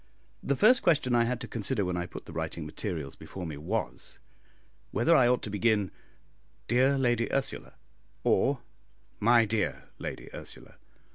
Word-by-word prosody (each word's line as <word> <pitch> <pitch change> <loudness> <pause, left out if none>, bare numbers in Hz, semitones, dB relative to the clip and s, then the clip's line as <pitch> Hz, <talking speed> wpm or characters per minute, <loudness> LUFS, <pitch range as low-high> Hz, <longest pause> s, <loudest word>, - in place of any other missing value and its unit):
The 140 - 0
first 240 - +6
question 150 -7 +3
I 120 -1 +4
had 125 0 -1
to - - -5
consider 105 -2 -1
when 90 0 -1
I 90 0 -2
put - - -9
the - - -10
writing 80 0 -4
materials 75 -3 -4
before 95 -2 -8
me 80 -3 -5
was, 80 - -3 0.7
whether 120 - +3
I 125 -5 +6
ought 125 0 +2
to 105 - -4
begin, 105 -1 +2 0.8
"Dear 130 +4 +4
Lady 120 -3 +1
Ursula," 135 -1 -2 0.5
or, - - +2 0.6
"My 115 +1 +5
dear 110 0 -2
Lady - - -6
Ursula." - - -11
115 Hz, 155 wpm, -29 LUFS, 90-125 Hz, 0.8 s, first